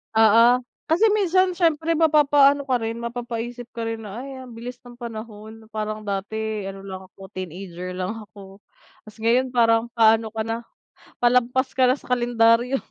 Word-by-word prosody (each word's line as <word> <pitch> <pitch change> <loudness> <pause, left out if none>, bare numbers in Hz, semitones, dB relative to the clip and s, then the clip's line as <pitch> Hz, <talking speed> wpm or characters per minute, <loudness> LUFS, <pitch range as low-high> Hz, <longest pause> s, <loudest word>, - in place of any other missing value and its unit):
Oo, 230 +3 +6 0.3
kasi, 415 +7 +5
minsan 370 -2 +2
,siyempre 330 -1 +1
mapapaano 290 -3 +4
ka 255 - +2
rin, 225 +1 -3
mapapaisip 240 0 -5
ka 230 -1 -4
rin, 225 -1 -4
na, 210 +3 -7
ay, 265 0 -8
ang 250 - -12
bilis 235 +2 -8
ng 245 0 -14
panahon. 220 -1 -9
Parang 215 0 -4
dati 210 +1 -3
ano 195 0 -8
lang 190 -1 -8
ako, 190 0 -14
teenager 180 0 -7
lang 185 +5 -4
ako, 195 -1 -14 0.5
'tas 215 - -13
ngayon 250 +2 +2
parang 230 0 +3
paano 225 -1 +4
ka 220 - -1
na, 225 +1 -2 0.6
palampas 250 +2 +2
ka 255 -1 +3
na 260 - +2
sa - - -19
kalendaryo. 240 +1 +3
230 Hz, 165 wpm, -23 LUFS, 215-255 Hz, 0.6 s, Oo